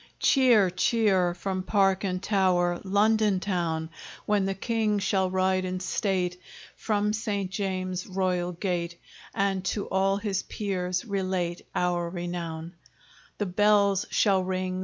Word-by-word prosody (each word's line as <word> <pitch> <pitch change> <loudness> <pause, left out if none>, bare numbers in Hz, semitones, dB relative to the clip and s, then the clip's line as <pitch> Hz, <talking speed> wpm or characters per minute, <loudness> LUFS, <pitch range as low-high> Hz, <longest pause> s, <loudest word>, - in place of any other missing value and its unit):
Cheer! 240 -9 +4
cheer! 185 -2 +2
from 190 0 -3
park 195 0 +2
and 185 -1 -2
tower, 180 -4 +2
London 205 0 +2
town! 170 -4 -2 0.3
When 205 -2 +2
the 195 - -2
King 220 0 0
shall 190 -2 +1
ride 185 0 +1
in 185 0 -3
state 185 -1 -1 0.3
From 210 -1 0
St. 205 -4 -2
James's 185 -1 -3
royal 185 -2 -1
gate, 170 -1 -3 0.4
And 195 -1 0
to 200 +3 -1
all 195 +1 +2
his 200 -2 -2
peers 185 -2 -3
relate 185 -4 -2
Our 175 -1 0
renown! 170 -2 -5 0.6
The 205 - -1
bells 200 +1 +3
shall 195 -3 +2
ring! 185 0 -2
190 Hz, 130 wpm, -27 LUFS, 180-200 Hz, 0.6 s, Cheer